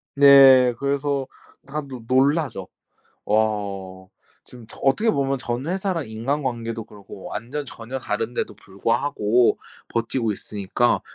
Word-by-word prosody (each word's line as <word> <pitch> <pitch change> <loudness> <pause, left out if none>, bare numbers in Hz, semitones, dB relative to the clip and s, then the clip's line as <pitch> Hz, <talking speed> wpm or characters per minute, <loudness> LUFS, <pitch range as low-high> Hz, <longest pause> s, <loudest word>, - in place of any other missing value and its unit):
네. 135 -3 +8
그래서 140 -1 -1 0.4
다들 140 -3 -6
놀라죠. 135 - +1 0.6
"와." 100 -3 -1 0.4
지금 120 -3 -13
저 - - -13
어떻게 210 +12 +3
보면 135 -3 0
전 120 +2 -4
회사랑 185 -3 -2
인간관계도 115 -1 -3
그렇고 100 -2 -13
완전 140 +6 -5
전혀 125 0 -7
다른데도 115 -2 -3
불구하고 115 +3 +1 0.3
버티고 115 -1 -1
있으니까 105 +4 -1
125 Hz, 265 characters per minute, -23 LUFS, 110-140 Hz, 0.6 s, 네